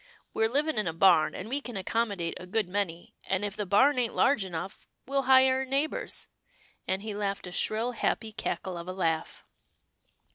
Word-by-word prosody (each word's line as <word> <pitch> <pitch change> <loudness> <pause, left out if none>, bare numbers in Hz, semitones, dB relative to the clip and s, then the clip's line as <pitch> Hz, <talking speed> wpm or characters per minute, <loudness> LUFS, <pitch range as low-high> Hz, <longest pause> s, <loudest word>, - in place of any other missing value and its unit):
" - - -38
We're 220 0 +2
living 290 0 0
in 210 - -1
a 165 - -1
barn, 165 -3 +4
and 195 - -6
we 275 +5 -2
can 245 -6 -6
accommodate 195 -3 -1
a 180 - -10
good 210 +1 0
many, 180 -3 -3
and 190 +2 0
if 205 0 -4
the 210 - -3
barn 255 +8 +4
ain't 235 -2 -1
large 245 -6 +3
enough, 190 +1 -6 0.2
we'll 275 +1 0
hire 260 0 +6
a - - -2
neighbour's," 275 +4 -1 0.6
and 190 +2 -1
he 215 -1 -4
laughed 200 -1 -2
a 180 - -7
shrill, 220 +6 0
happy 220 -1 -1
cackle 185 -4 -4
of 170 - -8
a 185 - -4
laugh. 165 -4 -2
205 Hz, 195 wpm, -29 LUFS, 185-245 Hz, 0.6 s, hire